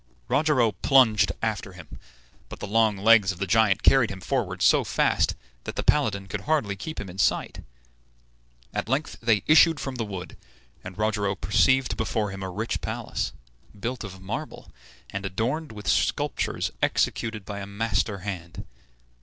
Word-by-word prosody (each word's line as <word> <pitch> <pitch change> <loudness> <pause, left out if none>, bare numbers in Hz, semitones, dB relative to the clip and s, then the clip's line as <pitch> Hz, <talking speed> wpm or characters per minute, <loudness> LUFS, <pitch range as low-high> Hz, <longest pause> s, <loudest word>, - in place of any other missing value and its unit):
Rogero 140 -7 +3
plunged 110 -1 +4
after 105 -3 -2
him, 90 -3 -12 0.5
but - - -9
the - - -5
long 110 0 +2
legs 105 -1 +5
of 90 - -8
the 100 - -2
giant 110 -1 +3
carried 135 -4 +5
him 95 - -7
forward 95 - -2
so - - +5
fast - - +1 0.3
that - - -5
the - - -2
paladin 105 -10 +1
could 95 0 -5
hardly 140 -7 0
keep 155 +11 -6
him 105 - -5
in 90 +1 -10
sight. - - 0 1.1
At - - -3
length 140 +4 -1
they 115 -3 +2
issued 160 0 +6
from 135 -2 -5
the 115 - -1
wood, 95 -4 -7 0.5
and 90 +1 -9
Rogero 105 -2 0
perceived 130 +5 +2
before 110 -2 -1
him 95 0 -7
a 95 - -4
rich 110 +5 -3
palace, - - -3 0.5
built 120 +4 -4
of 95 -3 -8
marble, 120 +12 -6 0.4
and 95 0 -4
adorned 120 +11 -2
with 105 -3 -9
sculptures - - 0
executed 110 -3 0
by 100 0 -6
a 100 - -6
master 100 -1 -1
hand. 85 -5 -6
105 Hz, 160 wpm, -25 LUFS, 95-120 Hz, 1.1 s, issued